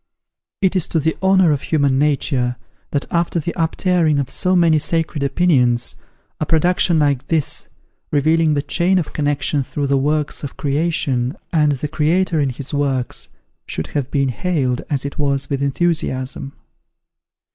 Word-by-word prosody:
It 190 0 +3
is 185 - +1
to 165 - 0
the 160 +2 0
honour 190 -3 +4
of 145 -2 0
human 140 -4 +1
nature, 135 -4 +1 0.3
that 145 - -1
after 170 0 0
the 170 +2 -3
uptearing 165 -1 +1
of 135 - -2
so 185 0 +1
many 165 -3 +4
sacred 160 -1 -1
opinions, 135 -6 +2 0.4
a - - 0
production 175 +1 +3
like 145 -4 +1
this, 160 -4 -1 0.4
revealing 155 +1 +3
the 145 - 0
chain 175 +6 +1
of 170 - -2
connection 145 -1 0
through 140 +2 -3
the 140 0 +2
works 150 +2 -1
of 140 - -6
Creation, 145 - 0 0.2
and 150 -3 +3
the 140 +2 -3
Creator 160 +3 +1
in 140 -2 +1
his 135 +3 -6
works, 135 -3 -1 0.4
should 80 - -4
have 140 -3 -1
been 140 -2 +1
hailed, 130 -3 -1
as 140 -2 -1
it 140 - -6
was, 140 -1 0
with 140 -1 -1
enthusiasm. 140 -3 -1
150 Hz, 155 wpm, -19 LUFS, 140-165 Hz, 0.4 s, honour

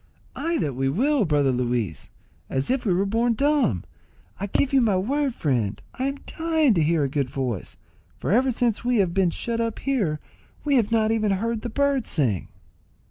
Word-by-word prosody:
Ay 335 0 -1
that 145 - -1
we 135 +2 0
will, 255 - +2
brother 145 -4 +2
Luis, 120 - -2 0.4
as 135 - -1
if 260 -1 0
we - - +3
were 185 +3 +2
born 230 +4 +1
dumb. 280 - +2 0.6
I 200 - -2
give 270 +7 0
you 270 - +5
my 210 -5 +2
word, 270 +6 0
friend, 120 -9 -1
I 260 - -3
am 275 +1 -2
dying 320 -5 +2
to 170 - +2
hear 155 0 +2
a - - +1
good 135 -1 -1
voice, 125 -8 -3 0.4
for - - -2
ever 255 +5 +4
since 240 -3 0
we 245 0 +1
have 185 -4 +2
been 190 -2 +3
shut 230 +6 -2
up 230 -1 -2
here 205 - 0 0.5
we 290 - +2
have 230 -5 +3
not 220 -1 +3
even 220 -2 +1
heard 225 +3 -1
the 240 - -4
birds 280 0 0
sing." 115 - 0
215 Hz, 195 wpm, -24 LUFS, -, 0.6 s, you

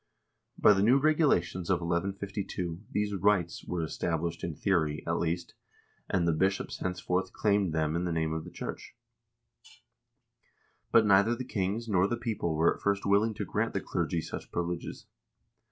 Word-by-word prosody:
By 105 - +6
the 95 - +1
new 120 +6 +5
regulations 140 - +2
of 95 -2 +3
1152 95 +1 -3
these 105 0 -1
"rights" 95 -3 +1
were 90 -2 -2
established 85 +1 -2
in 85 - -3
theory, 80 -6 0
at - - 0
least, 85 +1 -2 0.6
and 85 -2 +1
the - - +4
bishops 95 +5 0
henceforth 90 0 -2
claimed 100 -4 +1
them 80 0 0
in 85 +1 -1
the 90 - -1
name 80 -1 0
of 80 0 -3
the - - -9
church. - - -7 2.0
But 115 - +6
neither 100 +3 +5
the 130 +1 -5
kings 105 +1 -2
nor 95 -3 +3
the 120 - -2
people 110 -9 -2
were 80 +2 +4
at - - -16
first 100 0 0
willing 105 +2 +3
to - - -3
grant - - -1
the - - 0
clergy 85 - -1
such - - -7
privileges. 85 0 -4
95 Hz, 165 wpm, -30 LUFS, 85-105 Hz, 2.0 s, By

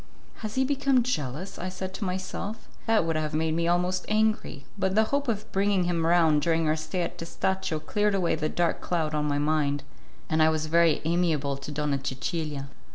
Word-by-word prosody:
"Has 215 -1 -5
he 265 0 +3
become 275 -2 +2
jealous?" 165 - -3
I 185 - -3
said 185 0 -5
to 200 - -5
myself; 190 +3 -4 0.2
that 220 -6 +3
would 165 -1 0
have 155 -1 -1
made 160 0 +1
me 170 +1 0
almost 180 +1 +1
angry, 215 -10 0
but 190 -1 0
the 220 - +5
hope 285 0 +1
of 215 -3 -2
bringing 195 -1 +2
him 170 -2 0
round 165 -3 +4
during 165 -1 +2
our 155 - +3
stay 160 +3 -2
at 170 - -5
Testaccio 165 0 -1
cleared 205 +6 0
away 180 -3 +1
the 155 -1 -1
dark 175 -1 0
cloud 160 -3 -1
on 150 -1 0
my 145 -1 0
mind, 145 -1 +1 0.4
and 160 0 +1
I 155 - +6
was 155 -1 0
very 165 0 +3
amiable 160 -5 +1
to 140 +2 -7
Donna 145 -1 -1
Cecilia. 140 +1 -3
170 Hz, 200 wpm, -27 LUFS, 155-190 Hz, 0.4 s, I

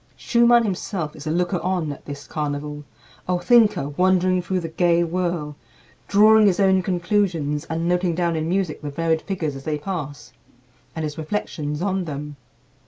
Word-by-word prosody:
Schumann 235 0 +4
himself 185 -6 -3
is 150 0 -10
the - - -2
looker 175 +2 0
on 180 -4 -1
at 145 - -10
this 145 0 -8
carnival, 150 0 -4 0.4
a 180 0 +1
thinker 210 - +3
wandering 185 +3 +2
through 185 +1 -1
the 165 - -4
gay 170 +1 +2
whirl, 170 -3 -2 0.5
drawing 215 +1 +6
his 190 -1 +2
own 190 -1 +4
conclusions, 175 -5 0
and 165 +1 -2
noting 175 -1 +1
down 170 -1 0
in 160 0 -2
music 185 -4 -1
the 150 - -5
varied 160 +2 0
figures 165 -7 -3
as 135 - -9
they 150 0 -2
pass, 145 -7 -6 0.6
and 160 - -3
his 150 0 -4
reflections 155 -2 -3
on 190 -2 -1
them. 150 -1 -6
170 Hz, 170 wpm, -22 LUFS, 150-185 Hz, 0.6 s, drawing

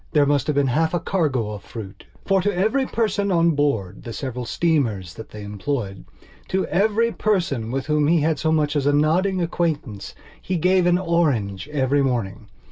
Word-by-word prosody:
There 150 -3 +5
must 145 -1 +1
have 150 - 0
been 145 -1 +3
half 160 +3 +1
a - - +1
cargo 145 - -1
of 105 -1 -7
fruit. 100 -4 -9 0.2
For, 195 -1 +3
to 205 +2 +1
every 220 +9 +1
person 205 -3 0
on 170 -1 +4
board 140 - -1
the 115 - -7
several 125 -1 -4
steamers 115 - 0
that 110 +4 -10
they 105 -1 -9
employedto 105 - -5
every 220 +4 +2
person 170 - 0
with 130 +2 -2
whom 150 -1 +2
he 165 0 +3
had 155 0 +1
so 160 - +1
much 150 -1 +1
as 145 -1 +1
a 145 - +3
nodding 175 +5 +2
acquaintance, 150 - -3 0.3
he 185 - -2
gave 180 +2 +3
an 175 0 +4
orange 145 - 0
every 140 -1 +1
morning. 110 -6 -2
150 Hz, 185 wpm, -22 LUFS, 120-175 Hz, 0.3 s, There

